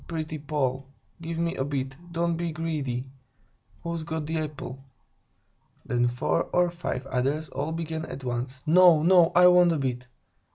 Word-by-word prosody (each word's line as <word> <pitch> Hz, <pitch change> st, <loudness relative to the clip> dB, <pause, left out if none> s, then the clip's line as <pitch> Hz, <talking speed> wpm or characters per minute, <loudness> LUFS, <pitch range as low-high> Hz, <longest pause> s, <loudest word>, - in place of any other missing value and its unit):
Pretty 155 Hz, -2 st, -4 dB
Poll! 140 Hz, -3 st, -2 dB, 0.3 s
Give 165 Hz, 0 st, -5 dB
me 170 Hz, +1 st, -1 dB
a 135 Hz, -, -1 dB
bit; 135 Hz, -1 st, -3 dB, 0.2 s
don't 170 Hz, 0 st, 0 dB
be 170 Hz, 0 st, -2 dB
greedy! 145 Hz, -6 st, -3 dB, 0.7 s
Who's 170 Hz, -1 st, -3 dB
got 160 Hz, 0 st, -4 dB
the 160 Hz, +1 st, -2 dB
apple?" 145 Hz, -3 st, -6 dB, 1.0 s
Then 120 Hz, 0 st, +1 dB
four 120 Hz, +2 st, 0 dB
or 175 Hz, -1 st, +1 dB
five 170 Hz, -7 st, -4 dB
others 135 Hz, +4 st, -1 dB
all 140 Hz, +4 st, -3 dB
began 160 Hz, -1 st, -4 dB
at 135 Hz, -, -8 dB
once: 125 Hz, +1 st, -4 dB
"No, 170 Hz, -1 st, +6 dB
no, 175 Hz, -1 st, +5 dB
I 180 Hz, +1 st, +7 dB
want 180 Hz, -1 st, +6 dB
a -, -, 0 dB
bit! 125 Hz, -2 st, -3 dB
155 Hz, 160 wpm, -26 LUFS, 135-165 Hz, 1.0 s, I